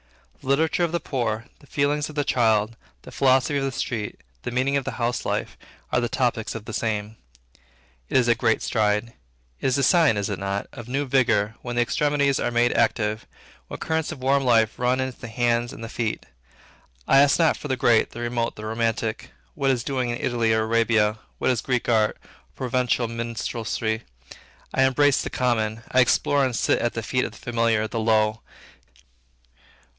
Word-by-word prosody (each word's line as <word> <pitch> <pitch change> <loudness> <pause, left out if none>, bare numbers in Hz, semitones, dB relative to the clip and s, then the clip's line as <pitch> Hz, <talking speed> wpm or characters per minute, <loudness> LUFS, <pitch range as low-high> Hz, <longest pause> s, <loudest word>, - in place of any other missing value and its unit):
The - - -13
literature 160 +5 +2
of 170 - 0
the 170 - 0
poor, 115 -6 -2
the 145 - -19
feelings 145 +2 0
of 155 - -10
the 145 - +1
child, 110 -4 +2 0.3
the - - -11
philosophy 135 +1 +2
of - - -2
the 135 - -1
street, 115 -4 -4 0.2
the - - -4
meaning 130 +3 0
of 140 -2 -1
household 120 0 -2
life, - - -3 0.4
are 125 - +2
the 120 - -1
topics 115 -3 -1
of 110 -1 -7
the 110 - -7
time. 110 -1 -2 0.9
It - - +2
is 125 -2 +3
a 120 - +5
great 115 -1 +1
stride. 105 +1 0 0.5
It - - -1
is 130 - +2
a 140 - +1
sign, 160 -6 +4
is 100 -1 -1
it - - -3
not? 100 +1 -2
of 120 -3 -9
new 140 +3 -1
vigor, 115 -5 +2
when 120 -1 -5
the 120 - +3
extremities 140 +1 +1
are - - 0
made 120 0 +2
active, 110 -1 0 0.4
when - - -7
currents 160 +1 -1
of 135 -5 -8
warm 135 +1 +3
life 115 -3 +2
run 125 +1 +1
into 130 -1 -3
the - - -7
hands 120 +1 0
and 115 - -9
the - - -4
feet. 115 -1 -3 0.8
I 135 - +6
ask 140 0 +5
not 165 -2 +3
for - - -7
the 130 -2 -1
great, 120 -3 +3
the 120 - -8
remote, 120 -1 -2
the 110 - -8
romantic; 115 0 -2 0.2
what 135 - 0
is 125 -3 +1
doing 130 -3 -1
in 120 - -2
Italy 120 -2 0
or 110 0 +2
Arabia; 110 -1 +2 0.2
what - - +1
is 120 - -1
Greek 125 -2 -1
art, 110 -2 +2
or - - -38 0.3
Provencal 125 -1 0
minstrelsy; 115 -1 -3 0.7
I - - +2
embrace 135 +1 +4
the - - -4
common, 115 -3 -1
I 130 - +3
explore 140 +3 +3
and 130 -3 0
sit - - +2
at 120 - -1
the 115 - -3
feet 125 +3 0
of - - -6
the - - -13
familiar, 115 -2 0
the 115 +1 -4
low. 110 -1 +2
120 Hz, 200 wpm, -24 LUFS, 110-130 Hz, 0.9 s, I